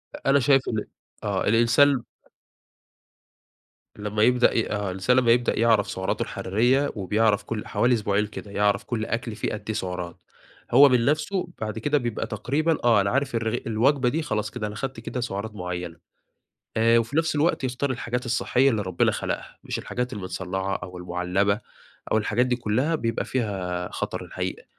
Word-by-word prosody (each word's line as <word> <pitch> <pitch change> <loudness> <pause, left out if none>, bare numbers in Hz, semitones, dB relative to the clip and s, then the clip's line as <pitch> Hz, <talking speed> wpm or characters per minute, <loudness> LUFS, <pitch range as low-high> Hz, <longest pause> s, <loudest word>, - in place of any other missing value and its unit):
أ - - -3
أنا 140 +1 +5
شايف 135 +1 +4
إن 110 -2 -2 0.4
آه - - -1
الإنسان 120 +5 +5
ب 120 - -9 1.9
لما 105 +1 -1
يبدأ 125 0 +4
ي 115 - 0
آه، 100 -1 -1
الإنسان 95 +7 +1
لما 120 -2 +4
يبدأ 120 -1 +2
يعرف 115 -3 +3
سعراته 95 0 -2
الحرارية، 120 +9 +1
وبيعرف 105 +1 +1
كل 110 -1 -5
حوالي 125 +1 +2
أسبوعين 105 -2 +1
كده، 105 -1 -9
يعرف 100 0 +1
كَل 110 -3 -3
أكل 115 -1 -3
فيه 105 - -2
قد 110 - -3
إيه - - -23
فيه 110 - -2
سعرات؛ 90 -4 -4 0.6
هو 140 +4 +8
من 125 -2 +3
نفسه 170 +6 0
بعد 110 +1 -3
كده 145 +6 +1
بيبقى 120 -4 -2
تقريبًا، 150 +9 0
آه، 115 -4 +5
أنا 100 - 0
عارف 140 0 0
الرغ 115 +1 0
الوجبة 125 +3 +2
دي 160 +5 -1
خلاص 105 -7 -2
كده، 110 -4 -4
أنا 105 - -7
خدت 130 +2 -4
كده 125 +2 -4
سعرات 110 -2 -4
معيّنة. 90 -3 -5 0.8
آآ، 115 +1 +5
وفي 115 +5 -2
نفس 165 -1 +2
الوقت 150 -1 +1
يختار 130 +2 -1
الحاجات 125 0 -3
الصحية 125 +3 +2
اللي 110 -3 0
ربنا 95 -2 +1
خلقها، - - -4
مش - - -3
الحاجات 125 +1 -3
المتصنعة 95 -1 -3
أو 90 0 -9
المعلبة 90 +4 0 0.5
أو - - +4
الحاجات 110 +3 +1
دي 125 - +1
كلّها، 125 +8 0
بيبقى 115 -6 -1
فيها 95 -7 -2
خطر - - -4
الحقيقة. - - -5
115 Hz, 175 wpm, -25 LUFS, 100-125 Hz, 1.9 s, هو